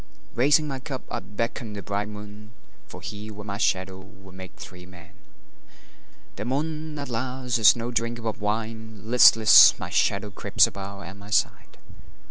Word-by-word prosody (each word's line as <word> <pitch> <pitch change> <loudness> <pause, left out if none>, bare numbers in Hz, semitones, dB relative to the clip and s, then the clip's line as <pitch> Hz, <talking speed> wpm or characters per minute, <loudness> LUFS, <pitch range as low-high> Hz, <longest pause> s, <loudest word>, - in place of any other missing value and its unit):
Raising 145 +5 +3
my 135 -2 -5
cup 130 0 -7
I 120 - -2
beckon 115 +2 -5
the 100 -1 -7
bright 105 +1 -3
moon, 105 +1 -11 0.3
For - - -11
he, 105 +1 -7
with 105 -1 -9
my 100 -1 -5
shadow, 95 -2 -1
will 95 -1 -16
make 95 0 -11
three 90 0 -11
men. 90 -2 -15 1.3
The 105 - -4
moon, 155 +4 -3
alas, 125 -1 -3
is 110 +2 +7
no 120 +1 -5
drinker 115 -1 -3
of 110 - -4
wine; 110 0 -4
Listless, 115 -1 +7
my - - -7
shadow - - 0
creeps - - +3
about 100 0 -8
at 95 +3 -10
my 100 +1 -13
side. 105 - -1
110 Hz, 160 wpm, -24 LUFS, 100-120 Hz, 1.3 s, is